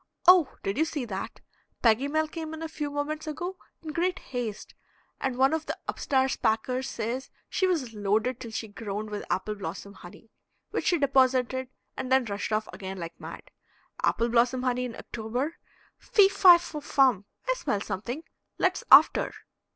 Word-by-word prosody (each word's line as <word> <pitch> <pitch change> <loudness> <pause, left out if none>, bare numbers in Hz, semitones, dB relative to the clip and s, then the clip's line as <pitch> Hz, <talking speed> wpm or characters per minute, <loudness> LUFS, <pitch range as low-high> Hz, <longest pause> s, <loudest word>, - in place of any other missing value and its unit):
"Oh, 360 -5 +7
did 195 +7 -2
you 320 - +4
see 295 -5 -3
that? 195 -4 -6 0.4
Peggy 235 +4 +4
Mel 310 +2 +1
came 315 0 -6
in 320 - -7
a - - -2
few 300 -2 -4
moments 290 +2 -3
ago 350 +5 -4 0.3
in 310 - -5
great 360 +4 0
haste, 245 - -5 0.5
and 260 -2 -2
one 270 +3 +4
of 320 -1 -2
the - - -3
up - - -4
stairs 265 -1 +1
packers 250 +4 0
says 235 +4 -3 0.2
she 375 - +1
was 290 -11 -1
loaded 215 +4 0
till 230 - -7
she 220 0 -4
groaned 210 0 -5
with 205 - -4
apple 210 +3 -1
blossom 200 0 -7
honey 190 +4 -14 0.4
which - - -2
she 350 - +4
deposited, 260 -2 +2 0.3
and 255 - -5
then 260 -1 +4
rushed 205 0 -4
off 215 0 0
again 190 0 -6
like 170 -2 -7
mad. - - -10 0.5
Apple 235 +1 +1
blossom 245 +2 +2
honey 250 0 0
in 240 - -6
October! 245 +8 -4 0.4
Fee, 400 -2 +5
fi, 380 -3 +8
fo, 335 -3 -7
fum! 260 -8 +3 0.2
I - - +3
smell 270 - -1
something! 225 - -4 0.3
Let's - - +1
after." - - +7
255 Hz, 175 wpm, -28 LUFS, 220-305 Hz, 0.5 s, fi